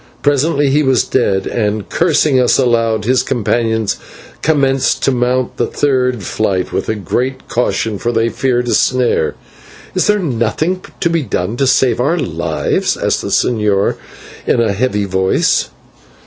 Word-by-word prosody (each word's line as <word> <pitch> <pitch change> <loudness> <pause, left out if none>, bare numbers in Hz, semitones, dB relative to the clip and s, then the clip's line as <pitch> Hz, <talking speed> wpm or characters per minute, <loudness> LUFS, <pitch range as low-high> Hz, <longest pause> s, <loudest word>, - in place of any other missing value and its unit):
Presently 145 0 +2
he 150 +2 +3
was 130 -4 +2
dead, 100 -7 0
and, 105 -2 -2
cursing 155 -5 +2
us 125 - +3
aloud, 115 -4 +1
his 130 +2 +3
companions 115 -2 -1 0.4
commenced 135 -4 +1
to - - +3
mount 125 0 0
the - - 0
third 125 -5 0
flight 95 -1 -1
with 105 -4 -3
great 130 +8 -2
caution, 110 -3 -1
for 120 - -1
they 115 0 +1
feared 125 -1 -1
a - - +1
snare. 125 -10 +1 0.6
"Is - - +1
there 210 0 +3
nothing 155 - -1 0.2
to 170 - +2
be 165 -1 +1
done 105 -5 -2
to 135 - +1
save 130 -1 +2
our 155 +7 +1
lives?" 85 - -1
asked - - 0
the - - -5
señor, 105 -4 +1 0.5
in - - +2
a 110 -3 +1
heavy 105 -1 0
voice. 95 0 +1
125 Hz, 150 wpm, -15 LUFS, 110-135 Hz, 0.6 s, he